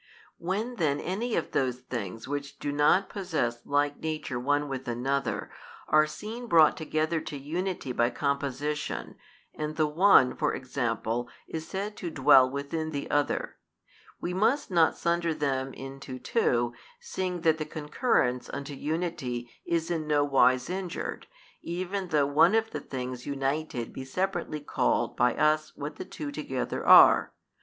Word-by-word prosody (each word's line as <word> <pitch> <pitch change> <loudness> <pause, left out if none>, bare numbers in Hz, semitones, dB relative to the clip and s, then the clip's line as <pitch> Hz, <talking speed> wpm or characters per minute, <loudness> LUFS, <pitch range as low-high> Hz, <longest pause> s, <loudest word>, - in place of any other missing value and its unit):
When 210 +8 -2
then 145 -5 +1
any 220 +6 -2
of - - -2
those 130 -1 0
things 115 -4 -5
which 140 0 -4
do 145 - -3
not 150 +7 +3
possess 155 - -2
like 145 0 +1
nature 155 -5 -3
one 145 +3 +1
with 135 -1 -5
another, 130 +2 -2 0.4
are 155 0 +5
seen 215 +10 -7
brought 160 -6 +6
together 155 +1 -1
to 145 - -6
unity 170 +1 -3
by 120 -1 +2
composition, 140 +2 -2 0.4
and 155 0 -4
the 155 - +2
one 150 -4 +5
(for - - 0
example) 120 -2 -2 0.2
is 160 0 -5
said 200 +2 -4
to 175 - -4
dwell 135 -3 +6
within 140 +4 -3
the 145 -2 -4
other; 145 0 0 0.6
we 175 - -3
must 220 +7 +1
not 165 -3 +4
sunder 170 -1 0
them 135 -3 -1
into 135 0 -8
two, 120 -1 +1 0.3
seeing 185 - -3
that 160 -1 +3
the 155 - -2
concurrence 150 - 0
unto 140 +1 -5
unity 140 -6 -3 0.2
is 170 0 0
in 160 -3 -2
no 145 -1 +3
wise 130 -3 +3
injured, 180 0 -4 0.3
even 185 +3 -3
though 150 -4 +2
one 155 +8 +4
of 225 0 +1
the 150 - -4
things 125 -2 -6
united 135 -3 -2
be 135 - -6
separately 175 +1 -2
called 145 - 0
by 125 0 +2
us 155 0 +2
what 145 +1 -6
the - - -6
two 145 -2 -6
together 140 -3 -3
are. - - +7
150 Hz, 150 wpm, -28 LUFS, 135-170 Hz, 0.6 s, are